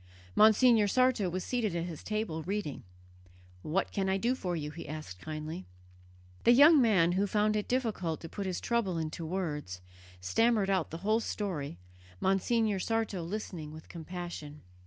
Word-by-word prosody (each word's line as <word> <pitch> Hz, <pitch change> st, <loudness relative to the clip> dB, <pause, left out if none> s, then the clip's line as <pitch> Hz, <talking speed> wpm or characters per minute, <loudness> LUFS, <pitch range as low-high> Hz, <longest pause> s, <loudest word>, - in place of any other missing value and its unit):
Monsignor 220 Hz, 0 st, +6 dB
Sarto 255 Hz, -3 st, +2 dB
was 185 Hz, +1 st, -3 dB
seated 225 Hz, -8 st, -1 dB
at 170 Hz, -, -1 dB
his 170 Hz, -4 st, -7 dB
table 215 Hz, -7 st, -2 dB
reading. 185 Hz, -4 st, -3 dB, 0.8 s
"What 165 Hz, -, -1 dB
can 195 Hz, -1 st, -1 dB
I 190 Hz, -, +2 dB
do 235 Hz, +6 st, +1 dB
for 180 Hz, -9 st, -3 dB
you?" 150 Hz, -2 st, -4 dB
he 165 Hz, -, -8 dB
asked 150 Hz, -12 st, -7 dB
kindly. 155 Hz, -, -6 dB, 0.8 s
The 240 Hz, -, +7 dB
young 290 Hz, +3 st, +8 dB
man, 190 Hz, -8 st, +4 dB
who 195 Hz, +3 st, +1 dB
found 210 Hz, +1 st, +2 dB
it 210 Hz, -, -1 dB
difficult 215 Hz, -10 st, -1 dB
to 165 Hz, -, -7 dB
put 195 Hz, +3 st, -5 dB
his 185 Hz, -, -2 dB
trouble 225 Hz, -7 st, 0 dB
into 160 Hz, +1 st, -4 dB
words, 150 Hz, -, -3 dB, 0.4 s
stammered 205 Hz, -, +2 dB
out 185 Hz, -4 st, +1 dB
the 165 Hz, -, -6 dB
whole 215 Hz, +2 st, +3 dB
story, 175 Hz, -, -3 dB, 0.4 s
Monsignor 205 Hz, +2 st, +1 dB
Sarto 225 Hz, -3 st, -1 dB
listening 170 Hz, -4 st, -5 dB
with 155 Hz, 0 st, -12 dB
compassion. 170 Hz, -3 st, -7 dB
190 Hz, 160 wpm, -31 LUFS, 160-215 Hz, 0.8 s, young